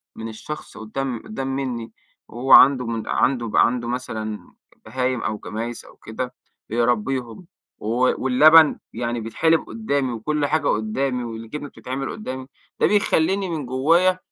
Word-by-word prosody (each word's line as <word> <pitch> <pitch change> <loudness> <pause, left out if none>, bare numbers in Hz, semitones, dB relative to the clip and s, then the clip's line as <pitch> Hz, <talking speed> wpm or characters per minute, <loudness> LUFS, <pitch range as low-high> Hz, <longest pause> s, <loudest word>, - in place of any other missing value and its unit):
من 110 - -6
الشخص 130 +7 -8
قدّام 120 +2 -4
قدّام 175 -12 -5
مني، 125 -4 -4 0.4
هو 125 +3 -3
عنده 125 -5 +6
عنده 120 -4 +1
عنده 120 0 +2
مثلًا 110 -4 -5 0.3
بهايم 130 -1 -1
أو 110 -1 -2
جمايس 115 +3 -6
أو - - -16
كده، 125 +3 -6 0.4
بيربيهم، 120 +4 -1 0.3
و 105 - -7 0.4
واللبن 150 +4 +6
يعني 120 0 -2
بيتحلب 160 +9 +2
قدّامي، 140 - -1
وكل 145 +6 -1
حاجة 150 0 0
قدّامي 125 +4 -1
والجبنة 115 +5 -7
بتتعمل 135 +1 -5
قدّامي، 130 -11 -6 0.3
ده - - +4
بيخلّيني 195 -2 +2
من 155 -4 -3
جوايا 165 +9 +3
130 Hz, 130 wpm, -22 LUFS, 115-145 Hz, 0.4 s, عنده